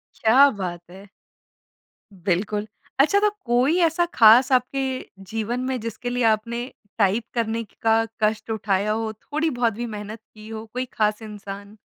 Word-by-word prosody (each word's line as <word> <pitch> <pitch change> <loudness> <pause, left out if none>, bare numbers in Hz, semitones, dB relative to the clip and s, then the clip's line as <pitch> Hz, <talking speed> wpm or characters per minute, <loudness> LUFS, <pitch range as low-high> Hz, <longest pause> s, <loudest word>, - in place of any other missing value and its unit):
क्या 265 +6 +6
बात 175 -2 -4
है! 195 +2 -13 1.0
बिल्कुल। 200 +4 -1 0.3
अच्छा, 400 +9 +5
तो 420 0 +3 0.2
कोई 250 +8 +2
ऐसा 330 +2 +1
खास 235 +4 +7
आपके 260 +2 +1 0.5
जीवन 225 +2 -2
में 260 -1 -2
जिसके 230 +2 -5
लिए 245 0 -1
आपने 230 +2 0 0.3
टाइप 210 +2 +2
करने 230 -1 -1
की 205 - -21
का 225 0 +3 0.2
कष्ट 215 +1 0
उठाया 205 -1 0
हो, 220 0 -1
थोड़ी-बहुत 245 -2 -1
भी 240 +3 -4
मेहनत 210 +2 -7
की 215 0 -13
हो, 220 0 -6
कोई 255 +1 -2
खास 215 0 0
इंसान? 205 -1 -9
225 Hz, 150 wpm, -23 LUFS, 210-245 Hz, 1.0 s, खास